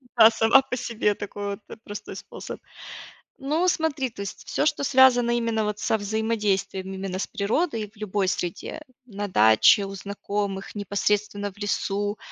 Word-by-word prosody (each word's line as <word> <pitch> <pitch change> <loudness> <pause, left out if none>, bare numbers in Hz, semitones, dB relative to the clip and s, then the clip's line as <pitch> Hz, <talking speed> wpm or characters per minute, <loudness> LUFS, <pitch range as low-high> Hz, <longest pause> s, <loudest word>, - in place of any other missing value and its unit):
да. 225 -2 +9
Сама 225 +4 +5
по 270 -1 -4
себе 220 -4 0
такой 205 0 -6
вот, - - -21
э, - - -8
простой 205 0 -8
способ. - - -8 0.8
Ну, 300 +6 0
смотри, 310 -6 0
то 225 - -17
есть 200 - -7
всё, - - 0
что 295 -2 +1
связано 255 -3 +5
именно 230 -2 0
вот 210 0 -2
со 220 - +1
взаимодействием 205 -3 -1
именно 190 -1 -4
с - - -2
природой 220 - -1
в 215 - -30
любой 205 -2 -1
среде: 180 - -3 0.2
на 205 -3 -5
даче, 110 - +5
у 195 0 -7
знакомых, 200 0 -4
непосредственно 205 0 -1
в 195 - -19
лесу,- 205 0 -1
210 Hz, 160 wpm, -25 LUFS, 200-235 Hz, 0.8 s, да